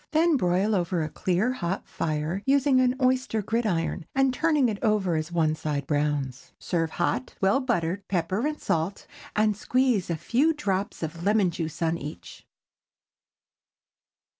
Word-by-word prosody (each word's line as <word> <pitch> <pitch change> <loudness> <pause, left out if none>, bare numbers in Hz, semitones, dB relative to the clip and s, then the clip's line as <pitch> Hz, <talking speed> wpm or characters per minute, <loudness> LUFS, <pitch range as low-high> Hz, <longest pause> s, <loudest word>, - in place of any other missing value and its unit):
Then 325 +1 +4
broil 190 -1 +2
over 175 -3 0
a 155 - -3
clear, 190 +10 0
hot 190 -5 -3
fire, 155 +4 -2
using 275 -1 +4
an 250 0 +2
oyster 255 -4 +1
gridiron, 190 -7 -1
and 270 -1 +3
turning 300 -2 +2
it 210 -3 -2
over 210 -6 +2
as 155 +1 -2
one 160 -3 +2
side 150 -3 -3
browns. 145 -3 -2
Serve 165 -2 -1
hot, 130 -4 -2
well 195 +7 +3
buttered, 200 -7 -1
pepper 195 - 0
and 300 0 -4
salt, 165 +5 -1 0.3
and 215 0 +3
squeeze 245 -3 +1
a 170 - 0
few 280 - +2
drops 200 - -2
of 165 +1 -5
lemon 205 -2 +3
juice 165 0 -4
upon 165 +1 0
each. 135 - -9
190 Hz, 150 wpm, -26 LUFS, 165-250 Hz, 0.3 s, Then